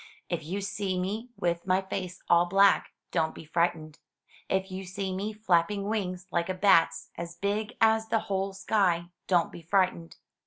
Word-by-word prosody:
If 175 -3 -2
you 185 +6 -3
see 195 -2 -2
me 210 +6 -3
with 170 +1 -1
my 185 +1 +2
face 185 -1 -5
all 170 +1 +5
black, 195 +2 +4 0.2
don't 160 0 0
be - - -10
frightened. 160 -1 -1 0.5
If 190 0 0
you 190 +1 -5
see 190 0 -4
nie 200 +3 -2
flapping 200 -2 +1
wings 185 -4 -2
like 170 +1 0
a 185 - -1
bat's, 185 -3 +3
as 170 0 -6
big 205 +3 -2
as 220 0 +4
the 225 -1 +1
whole 195 -2 -2
sky, 185 -3 +1 0.2
don't 175 -3 +2
be 170 - -10
frightened. 175 -1 0
185 Hz, 170 wpm, -28 LUFS, 170-200 Hz, 0.5 s, all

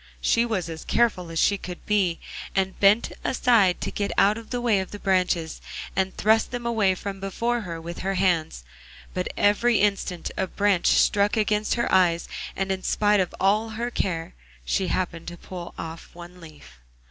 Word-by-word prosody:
She 230 - +2
was 190 -7 -2
as 160 -1 -7
careful 195 -8 +1
as 165 - -5
she 200 +4 +3
could 180 -1 -8
be, 195 -5 +1 0.4
and 190 -1 0
bent 205 +3 +4
aside 225 -8 +3
to - - -3
get 200 -1 -2
out 205 +2 +5
of 225 0 -10
the 245 - -2
way 230 -5 +2
of 190 - -4
the 205 - -7
branches, 180 -5 0 0.3
and 190 0 -1
thrust 220 +1 +3
them 245 -1 -5
away 215 -5 +2
from 195 +1 -6
before 230 +5 -1
her 170 -5 -6
with 170 +1 -7
her 195 +1 -2
hands; 165 - 0 0.5
but 180 0 -2
every 210 +3 +3
instant 195 -4 -1
a 190 - -1
branch 200 -2 +1
struck 205 +1 +3
against 210 0 +1
her 235 - 0
eyes, 175 -3 +3 0.3
and 195 0 -1
in 190 0 -2
spite 210 +1 +2
of 185 - -1
all 210 +4 +2
her 240 +1 -2
care, 165 -7 -2 0.3
she 185 - 0
happened 170 -3 -2
to 175 0 -7
pull 175 0 -9
off 165 0 -7
one 175 +1 -11
leaf. 155 - -14
195 Hz, 185 wpm, -25 LUFS, 175-210 Hz, 0.5 s, out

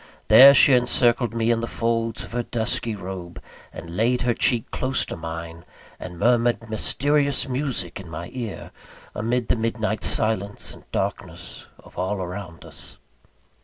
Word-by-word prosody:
There, 140 +2 +10
she 140 - +7
encircled 120 -1 +2
me 115 0 +1
in 115 - +1
the 115 - -3
folds 115 -1 -2
of - - -11
her 120 +1 -1
dusky 115 -1 -2
robe, 90 -3 -8 0.3
and 85 +1 -9
laid 120 +5 +1
her 120 -1 +2
cheek 115 -1 0
close 130 0 -1
to - - -6
mine, 80 0 -7 0.4
and 90 -1 -8
murmured 120 +4 +2
a - - -13
mysterious 140 +5 +1
music 125 - -2
in 95 -3 -10
my 85 +2 -7
ear, 120 -6 -6 0.4
amid 120 +3 -1
the - - +2
midnight 110 -3 -2
silence 105 -2 0
and - - -18
darkness - - -5
of - - -13
all 95 +3 -1
around 90 -2 -7
us. - - -9
115 Hz, 160 wpm, -23 LUFS, 95-120 Hz, 0.4 s, There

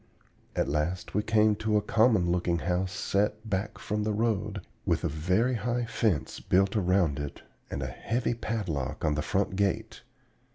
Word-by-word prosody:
At - - +1
last 75 +5 -1
we 105 - +2
came 110 0 +4
to 110 0 +1
a - - +2
common 110 -5 +3
looking 85 -1 +1
house 90 +2 -1
set 105 +3 -1
back 100 0 -2
from 105 +1 -2
the 105 0 0
road, 105 -3 -1 0.2
with - - 0
a - - +2
very 90 - +1
high 120 +2 -1
fence 110 - 0
built 95 +2 +2
around 90 -7 +2
it 75 -1 -6 0.3
and 70 - -3
a - - -2
heavy 115 - -1
padlock 95 - -3
on 75 - +2
the 75 - -1
front 95 +3 0
gate. 100 0 -1
100 Hz, 170 wpm, -29 LUFS, 85-110 Hz, 0.3 s, came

